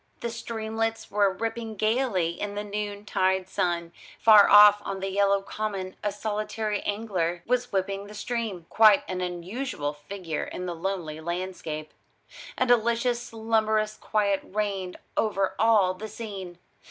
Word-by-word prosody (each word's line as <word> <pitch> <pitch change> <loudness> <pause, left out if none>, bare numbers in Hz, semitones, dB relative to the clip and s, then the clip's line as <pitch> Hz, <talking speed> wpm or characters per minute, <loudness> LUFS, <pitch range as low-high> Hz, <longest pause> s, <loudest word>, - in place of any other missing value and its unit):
The 235 - -3
streamlets 225 -1 -3
were 205 -1 +3
rippling 225 +2 -4
gaily 215 -5 +1
in 205 +4 -5
the 205 - -3
noontide 205 -2 -1
sun; 175 -3 -1 0.3
far 215 -2 +7
off 205 0 +8
on 195 -1 -4
the 195 0 -3
yellow 200 0 +2
common 195 -3 -4
a 205 - 0
solitary 215 0 -2
angler 185 -5 -2
was 245 0 0
whipping 195 +1 -2
the 210 - -11
stream 215 -6 -3
quite 215 -3 +6
an 185 -1 -3
unusual 180 - -3
figure 160 +2 -5
in 180 - -6
the 175 - -3
lonely 165 -3 -4
landscape. 170 -3 -4 0.7
A 255 - +2
delicious 235 0 +2
slumberous 220 -2 0
quiet 200 -3 0
reigned 195 -3 -3 0.2
over 195 -3 +1
all 210 -4 +4
the 205 +4 -7
scene. 200 -5 -7
205 Hz, 140 wpm, -27 LUFS, 185-220 Hz, 0.7 s, off